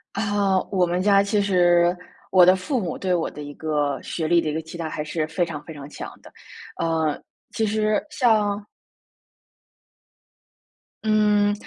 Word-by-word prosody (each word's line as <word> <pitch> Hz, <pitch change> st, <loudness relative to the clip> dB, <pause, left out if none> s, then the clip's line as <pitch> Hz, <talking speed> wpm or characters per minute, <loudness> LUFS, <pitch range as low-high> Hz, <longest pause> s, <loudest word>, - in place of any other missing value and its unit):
啊， 200 Hz, -2 st, +1 dB
我 185 Hz, -3 st, +2 dB
们 175 Hz, +1 st, -1 dB
家 200 Hz, 0 st, +4 dB
其 205 Hz, 0 st, +1 dB
实 175 Hz, -2 st, +3 dB, 0.3 s
我 185 Hz, -2 st, +6 dB
的 185 Hz, -, +6 dB
父 250 Hz, +7 st, -2 dB
母 175 Hz, -6 st, -3 dB
对 185 Hz, -1 st, -2 dB
我 170 Hz, -2 st, 0 dB
的 150 Hz, -, -9 dB
一 145 Hz, -, -7 dB
个 150 Hz, -2 st, -1 dB
学 160 Hz, -2 st, -3 dB
历 170 Hz, 0 st, +4 dB
的 160 Hz, -, -2 dB
一 -, -, -3 dB
个 160 Hz, -, -2 dB
期 160 Hz, +2 st, -10 dB
待 165 Hz, -, -3 dB
还 155 Hz, -1 st, -4 dB
是 155 Hz, 0 st, -3 dB
非 175 Hz, +2 st, -1 dB
常 155 Hz, -3 st, -5 dB
非 160 Hz, -, -9 dB
常 145 Hz, -1 st, -10 dB
强 -, -, -8 dB
的， -, -, -15 dB, 0.5 s
呃， 160 Hz, -2 st, 0 dB, 0.3 s
其 220 Hz, -, 0 dB
实， 215 Hz, 0 st, 0 dB
像 215 Hz, -6 st, +2 dB, 2.4 s
嗯， 210 Hz, -1 st, +3 dB
180 Hz, 180 characters per minute, -23 LUFS, 160-205 Hz, 2.4 s, 我